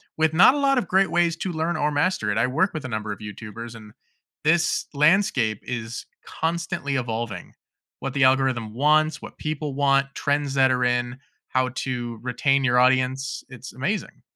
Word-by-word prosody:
with 160 0 +2
not 180 +10 +7
a 290 - -1
lot 275 -1 +3
of 240 - 0
great 190 0 +3
ways 170 0 +2
to 185 - -3
learn 165 +1 -1
or 150 -1 +1
master 145 - 0
it. 100 - -1
I 120 - +3
work 160 +10 +1
with 155 -4 -5
a - - -2
number 110 -3 -4
of 100 - -5
YouTubers 110 +2 -8
and 105 -2 -13 0.5
this 160 +2 +2
landscape 150 - +2
is 115 -2 -5 0.2
constantly 160 -4 -2
evolving. 115 -3 -4 0.5
What 135 - -4
the 135 -1 +3
algorithm 130 -4 +1
wants, 155 +3 +2
what - - -10
people 150 -2 -3
want, 135 0 +2
trends 145 -1 -1
that 135 -1 +4
are 125 -1 +1
in, 120 0 0 0.3
how 130 0 0
to 120 -3 -4
retain 135 +3 +1
your 125 -2 +2
audience, 130 +1 +2
it's 130 0 -10
amazing. 190 +12 -3
135 Hz, 180 wpm, -24 LUFS, 120-155 Hz, 0.5 s, not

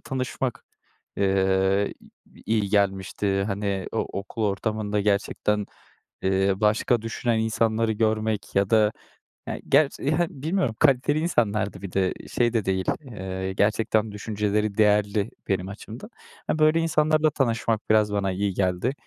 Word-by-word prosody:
tanışmak, 130 -1 -3 0.5
eee, 95 0 +2 0.3
i - - -26
i - - -18 0.2
iyi 100 - -2
gelmişti. 100 -1 0
Hani, 100 -2 -2
o - - -1 0.2
okul 105 +3 -6
ortamında 105 0 -1
gerçekten, 105 0 0 0.6
eee, 95 +1 +2
başka 105 +3 +2
düşünen 115 0 -1
insanları 110 0 +1
görmek 110 -1 -1
ya 100 0 +2
da 110 -2 +4 0.6
e - - -4
gerç 140 +1 +3
hani, 155 +4 +1 0.2
bilmiyorum 160 - 0
kaliteli 140 +3 +3
insanlardı 105 - 0
bir 100 -2 -7
de 95 -1 +1 0.2
şey 120 -1 +1
de 110 -4 0
değil, 95 -1 0 0.2
eee, 95 -6 -5
gerçekten 110 +2 +1
düşünceleri 105 0 -1
değerli 105 -1 +2 0.2
benim 95 -1 -1
açımdan. 110 - -9 0.4
E 155 - -1
böyle 155 +1 +4
insanlarla 155 -1 +2
tanışmak 115 -5 -1
biraz 110 -1 +4
bana 100 -2 0
iyi 100 +1 -1
geldi, 90 +6 0
105 Hz, 135 wpm, -25 LUFS, 100-115 Hz, 0.6 s, da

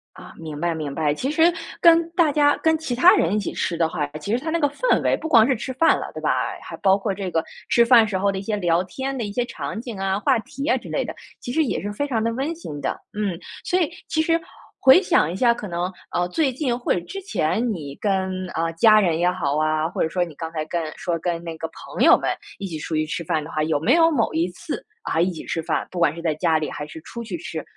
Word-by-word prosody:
啊， - - -12
明 155 -2 -7
白 170 0 0
明 150 -3 -4
白， 150 0 +1
其 265 - -2
实 320 +1 +3 0.4
跟 335 -1 +5
大 335 -4 +3
家 290 0 +4
跟 320 0 +2
其 310 -5 -4
他 345 - +6
人 400 - +1
一 210 - +2
起 200 - -4
吃 170 - -2
的 165 - +2
话， 160 -3 -2
其 150 - -8
实 235 - +3
它 320 - -2
那 335 +1 0
个 290 - +3
氛 - - +1
围 - - +3
不 320 - -5
光 230 -5 +6
是 265 - +2
吃 240 +3 -5
饭 325 +6 +4
了， - - -6
对 - - -7
吧？ - - 0 0.3
还 - - -8
包 190 0 +4
括 200 0 -2
这 190 -2 -4
个 160 - +1 0.3
吃 235 0 +5
饭 235 -2 +7
时 195 -3 -1
候 200 +1 +1
的 195 - -4
一 - - -3
些 210 +1 -2
聊 175 -2 +2
天 265 +8 -4
的 235 - -2
一 205 - -4
些 245 +3 -1
场 225 - -5
景 230 -3 -7
啊， 195 +1 -1
话 265 +2 +3
题 275 +5 -6
啊 350 - +4
之 - - -10
类 - - -1
的， - - -6 0.2
其 245 - -6
实 320 - +3
也 265 - -2
是 205 - -4
非 285 +7 -2
常 235 -5 0
地 230 - +1
温 275 +7 -2
馨 150 - -8
的。 - - -2
嗯， 200 -5 -2 0.2
所 365 - +1
以 335 - +1 0.2
其 315 - +1
实 330 +1 +2 0.4
回 265 +8 +8
想 330 - +2
一 180 - -4
下， 235 +3 +4
可 235 - -7
能， 175 +2 -2 0.2
呃， 175 0 0
最 280 - +1
近 250 -2 -1
或 245 - 0
者 - - 0
之 390 - -7
前 235 - 0
你 145 -6 -7
跟， 190 -1 -1
呃， 165 0 -1
家 215 +6 +6
人 175 -6 +2
也 175 +2 +2
好 150 -6 -1
啊， 155 0 +1
或 - - -4
者 160 - 0
说 180 +1 0
你 160 - -12
刚 160 +2 -6
才 155 -2 -3
跟 160 -2 -3
说 170 -2 -2
跟 170 0 -2
那 165 -1 -7
个 160 0 -5
朋 - - -4
友 - - +8
们 - - -1 0.2
一 195 - -4
起 160 -4 -5
出 155 +1 -4
去 155 - +1
吃 170 +1 -4
饭 160 -1 0
的 150 - -9
话， 155 -1 -1
有 155 -2 +1
没 215 - +3
有 330 0 +5
某 235 -7 +1
一 165 +3 +1
次， 180 - -6 0.2
啊， 165 - 0
一 180 +2 +2
起 165 - -8
吃 165 - -3
饭， - - -1
不 180 - -5
管 165 -3 +3
是 170 - -8
在 160 -3 0
家 160 0 +2
里 155 - -3
还 150 - -5
是 150 +2 -10
出 235 +8 -8
去 200 -6 -5
吃， 160 -2 -6
190 Hz, 305 characters per minute, -23 LUFS, 165-260 Hz, 0.4 s, 回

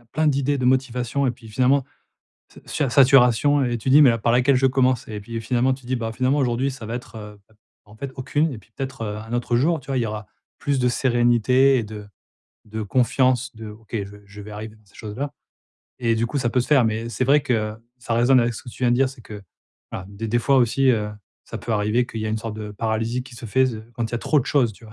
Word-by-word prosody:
a 120 - -26
plein 155 +7 -1
d'idées 140 0 +1
de 130 - -2
motivation 130 +1 +1
et - - +2
puis 115 -1 -12
finalement 130 +5 +2 0.6
ça - - -16
sui 145 -4 -1
saturation 135 +1 +5
et 120 -2 -1
tu 120 - -3
dis: 145 +3 +8
«Mais 135 - +7
a 115 - 0
par 115 +2 +1
laquelle 125 +3 +4
je 130 - +2
commence?» 130 -2 +1
et 105 -1 -6
puis, 115 +3 -7
heu, - - -1
finalement 125 +3 +1
tu 130 -1 -11
dis: 130 - 0
«Bah, 115 -2 -3
finalement, 130 +4 +1
aujourd'hui 130 0 +1
ça 130 -4 -9
va 115 - -4
être, 120 -2 -8
heu, 105 -1 -10
bah 110 - -27 0.3
en 105 +1 -17
fait 135 +4 -6
aucune 145 +4 0
et 125 - -6
puis 110 +1 -18
peut-être, 135 -2 -5
heu, 105 -1 -4
un 110 +2 -8
autre 120 0 0
jour». 155 +7 +2
Tu 135 - -19
vois? 135 - -1
Il - - +1
y - - 0
aura 105 0 -5 0.3
plus 140 -1 0
de 125 - +2
sérénité 125 +2 +3
et 120 - 0
de 105 -1 -9 0.6
de 110 +1 -5
confiance 130 +3 +1
de: 110 -1 -8
«OK 110 +1 -15
je 100 +1 -12
je 100 +1 -11
vais 105 +1 -10
arriver 105 +1 -8
dans 110 - -27
ces 100 - -25
choses-là 130 +7 -5 0.7
et 115 -2 +2
du 115 +1 0
coup 145 - -3
ça 120 -3 0
peut 125 - +2
se 125 - -3
faire». 140 -5 +5
Mais 110 +1 -1
c'est 130 +2 -1
vrai 145 +3 +4
que 110 -6 -1 0.2
ça 120 -1 -3
résonne 120 +3 +4
avec 120 0 0
ce - - -8
que - - -12
tu 130 - -11
viens 120 - +3
de 120 - +3
dire, 135 +1 +3
c'est 130 -2 -13
que 105 -2 -10 0.5
voilà, 95 - -6
des 100 +3 -6
des 120 +3 +2
fois 135 +3 +2
aussi, 130 +2 +3
heu, 105 -3 0 0.3
ça - - -7
peut 115 - -4
arriver 105 +3 +1
qu'il 115 - -6
y 110 - -2
a - - -2
une 110 - 0
sorte 110 0 -6
de 105 -1 -6
paralysie 115 +3 -2
qui 130 - -13
se 120 0 -8
fait 130 +4 +3
ze 120 -4 -4 0.2
quand 120 -1 -2
il - - -18
y - - -1
a - - 0
trop 150 - +2
de 130 - -7
choses, 125 -6 +2
tu 110 - -18
vois? 110 - -13
120 Hz, 280 wpm, -22 LUFS, 110-130 Hz, 0.7 s, dis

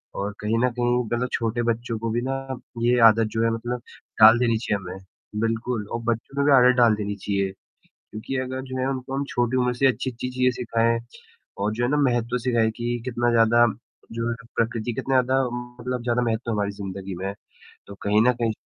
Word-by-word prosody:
और 100 +1 -2
कहीं 110 +2 0
न 125 - +3
कहीं 120 0 +1
मतलब 120 +3 -1
छोटे 115 0 -1
बच्चों 115 0 -1
को 115 0 -2
भी 120 +2 0
ना 130 +2 -2 0.5
ये 120 +1 +3
आदत 110 0 +4
जो 115 0 0
है, 115 - +3
मतलब 120 +2 -3 0.4
डाल 110 +2 +9
देनी 115 -2 +2
चाहिए 105 -2 -1
हमें। 95 +1 -8 0.4
बिल्कुल, 115 -1 -1
और 115 - -4
बच्चों 120 +4 -3
में 140 - +2
भी 145 - +4
आदत 125 -1 +6
डाल 115 -3 +5
देनी 105 -1 -3
चाहिए 100 -1 -1 0.4
क्योंकि 110 +5 -8
अगर 130 0 -3
जो 130 -1 -6
है 130 - 0
उनको 130 0 -4
हम 140 - -1
छोटी 120 +1 0
उम्र 125 -1 +1
से 135 +2 +3
अच्छी-अच्छी 125 0 -2
चीज़ें 125 0 +2
सिखाएँ 115 -1 +1 0.6
और 105 +2 0
जो 120 +2 -1
है 120 - +1
ना 150 - +2
महत्व 120 -1 +1
सिखाएँ 115 -3 +2
कि 120 0 -2
कितना 120 -1 0
ज़्यादा 115 +1 +5 0.5
जो 115 0 -2
है 120 - -1 0.2
प्रकृति 115 0 -1
कितना 130 +1 +2
ज़्यादा 130 +2 +1
मतलब 125 0 -5
ज़्यादा 120 0 0
महत्व 115 0 -1
हमारी 105 -2 0
ज़िंदगी 95 -1 -6
में, 95 +2 -4 0.5
तो 100 - -9
कहीं 105 +1 +3
न - - +5
कहीं 115 -1 +2
120 Hz, 205 wpm, -24 LUFS, 110-125 Hz, 0.6 s, डाल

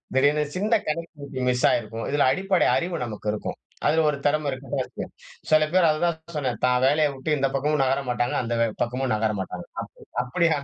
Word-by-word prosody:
திடீர்னு 145 +3 +4
சின்ன 210 +5 +2
connectivity 150 -4 -4
miss 125 0 +2
ஆகிருக்கும். 115 0 -1
இதில 145 -1 +3
அடிப்படை 190 +5 +2
அறிவு 175 0 -1
நமக்கு 105 -2 -5
இருக்கும். 105 - -4 0.3
அதில 160 +2 +3
ஒரு 145 - -1
திறம 150 0 +2
இருக்கு 130 +1 -7
பாருங்க. 130 -2 -3 0.5
சில 155 0 +6
பேர் 180 -2 +5
அத 155 0 0
தான் 170 -2 0 0.2
சொன்னேன் 130 -6 -2
தான் 125 0 +2
வேலைய 150 +2 +4
வுட்டு 135 +3 -6
இந்த 135 0 +2
பக்கமும் 150 +2 +1
நகர 135 +1 +1
மாட்டாங்க 120 0 0
அந்த 120 0 -2
வே 115 - +4 0.2
பக்கமும் 125 +2 -1
நகர 110 0 +1
மாட்டாங்க. 95 - -5
அப் - - -5 0.3
அப்டியான 150 +3 +1
140 Hz, 190 wpm, -25 LUFS, 125-155 Hz, 0.5 s, சில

